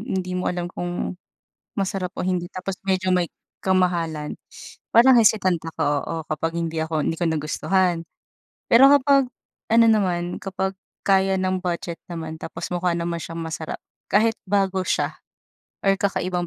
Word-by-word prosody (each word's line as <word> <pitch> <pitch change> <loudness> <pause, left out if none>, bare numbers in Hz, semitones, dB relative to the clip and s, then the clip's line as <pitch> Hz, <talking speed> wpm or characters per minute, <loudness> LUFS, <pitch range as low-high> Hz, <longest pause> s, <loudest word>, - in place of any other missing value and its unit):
hindi 190 -6 -3
mo 180 0 -1
alam 175 -1 -2
kung 175 +1 -3 0.7
masarap 195 -2 -1
o - - -1
hindi, 180 -2 -1
tapos 185 +1 -4
medyo 185 -1 +1
may 175 -2 +1 0.3
kamahalan, 170 -5 0 0.6
parang 250 +3 +7
hesitant 200 -5 +4 0.2
ako - - -2 0.2
oo, - - -4
kapag 165 +2 -2
hindi 165 -1 -1
ako 160 -1 -1
hindi - - 0
ko 175 - 0
nagustuhan. 165 +3 +1 0.7
Pero 265 +4 +8
kapag, 275 -2 +4 0.4
ano 230 0 +6
naman, 180 -5 +1
kapag 190 0 -2 0.3
kaya 195 -1 +4
ng 185 0 0
budget 170 -2 -3
naman 160 -2 -5
tapos 165 +1 -6
mukha 175 0 +1
naman 170 0 -2
siyang 165 0 -6
masarap, 160 -1 -5 0.3
kahit 220 +2 +4
bago 190 -1 +1
siya - - 0 0.7
or 195 - +5
kakaibang 185 -3 -1
185 Hz, 145 wpm, -23 LUFS, 170-195 Hz, 0.7 s, Pero